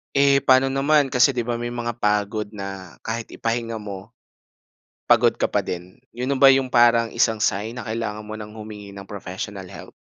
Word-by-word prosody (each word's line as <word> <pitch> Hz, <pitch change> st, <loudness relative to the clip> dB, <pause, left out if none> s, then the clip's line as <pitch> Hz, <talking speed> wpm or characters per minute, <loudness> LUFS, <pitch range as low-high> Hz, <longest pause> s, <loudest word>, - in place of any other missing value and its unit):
Eh, 140 Hz, 0 st, +5 dB
pa'no 130 Hz, 0 st, +4 dB
naman, 140 Hz, 0 st, +2 dB
kasi 125 Hz, +2 st, +4 dB
'di 120 Hz, -, 0 dB
ba 120 Hz, 0 st, -3 dB
may 120 Hz, -, -3 dB
mga 120 Hz, -1 st, -4 dB
pagod 105 Hz, 0 st, 0 dB
na 95 Hz, -3 st, -7 dB
kahit 115 Hz, +1 st, -4 dB
ipahinga 115 Hz, 0 st, -2 dB
mo, 105 Hz, +1 st, -8 dB, 0.9 s
pagod -, -, +5 dB
ka -, -, +2 dB
pa -, -, 0 dB
din. 90 Hz, +1 st, -7 dB
'Yun 125 Hz, +2 st, -5 dB
na -, -, -2 dB
ba 135 Hz, 0 st, +8 dB
'yung 135 Hz, 0 st, +3 dB
parang 120 Hz, -1 st, +5 dB
isang 115 Hz, -1 st, +2 dB
sign 105 Hz, +3 st, -1 dB
na 120 Hz, -, -7 dB
kailangan 110 Hz, -1 st, -4 dB
mo 110 Hz, -, -6 dB
nang 105 Hz, -1 st, -8 dB
humingi 105 Hz, -2 st, -9 dB
ng 100 Hz, 0 st, -10 dB
professional 95 Hz, -1 st, -7 dB
help? -, -, -11 dB
115 Hz, 190 wpm, -23 LUFS, 105-120 Hz, 0.9 s, ba